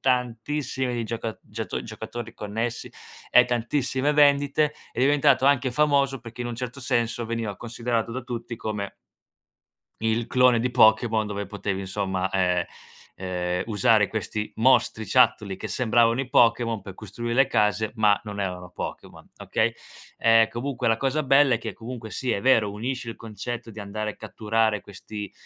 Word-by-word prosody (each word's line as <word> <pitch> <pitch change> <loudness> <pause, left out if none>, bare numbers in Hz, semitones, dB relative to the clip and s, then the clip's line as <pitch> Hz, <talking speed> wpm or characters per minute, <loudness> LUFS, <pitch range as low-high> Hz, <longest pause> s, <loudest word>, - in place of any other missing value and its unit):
tantissimi 125 +1 -1
di 120 -1 -2
gioca 115 0 -4
giato 110 +1 -5
giocatori 115 +1 -7
connessi, 115 +3 -4 0.4
e 125 - +7
tantissime 130 +4 0
vendite. 145 +1 +3 0.2
È - - -10
diventato 140 0 +4
anche 135 -2 +3
famoso 140 -1 +2
perché 120 +1 -8
in 120 - -4
un 120 - -4
certo 125 +3 -6
senso 120 -1 0
veniva 115 -3 -3
considerato 115 0 -2
da 130 - -3
tutti 120 -1 -6
come 105 -3 -4 1.1
il 110 +1 0
clone 125 -2 +4
di 125 +2 0
Pokémon 110 -1 +4
dove 100 -1 -4
potevi 100 -1 -3
insomma, 95 -1 -2
ehm, 90 -2 +1 0.9
uhm, - - -1
usare 105 -1 +3
questi 105 0 -4
mostriciattoli 110 -3 +3
che - - -6
sembravano 120 0 +2
i 135 - -4
Pokemon 115 -2 +3
pe 95 - -8
costruire 115 +4 -5
le 135 +2 +5
case, 105 +1 +1
ma 105 -3 +3
non 105 -1 -5
erano 90 -2 -4
Pokemon, - - -8
okay? - - 0 0.5
Ehm, 115 -1 +5
comunque 125 +1 -2
la 115 - +3
cosa 135 +5 0
bella 135 -1 +5
è - - -1
che - - -5
comunque 115 -1 -8
sì, 125 +1 -2
è 100 - -1
vero, 110 -4 +3
unisce 120 +3 -4
il - - -9
concetto 115 +1 -6
di 110 - -11
andare 105 +1 -4
a - - -12
catturare 110 -1 0
questi 100 0 -8
115 Hz, 160 wpm, -25 LUFS, 105-125 Hz, 1.1 s, e